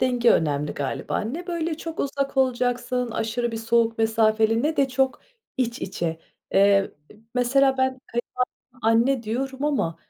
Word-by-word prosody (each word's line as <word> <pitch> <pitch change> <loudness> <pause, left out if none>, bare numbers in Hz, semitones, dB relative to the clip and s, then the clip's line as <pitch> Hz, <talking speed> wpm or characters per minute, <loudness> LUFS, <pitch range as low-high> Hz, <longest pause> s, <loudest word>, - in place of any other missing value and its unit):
denge 245 -2 +3
önemli 150 -2 +1
galiba, 140 -2 -2
ne 310 - -5
böyle 335 -2 -2
çok 325 0 -5
uzak 275 0 -2
olacaksın, 250 -1 0
aşırı 225 +2 -2
bir - - -3
soğuk 230 0 +1
mesafeli, 225 0 +2
ne 310 +2 0
de 275 -1 +3
çok 265 +1 0 0.4
iç 245 -1 -1
içe, 170 -4 -3 0.4
eee, - - +6
e 200 0 +4 0.4
mesela 265 +2 +3
ben 260 0 +1 0.6
kayınvalideme 255 - -27
anne 230 +3 +3
diyorum 265 +5 -3
ama 270 - 0
245 Hz, 150 wpm, -24 LUFS, 225-270 Hz, 0.6 s, eee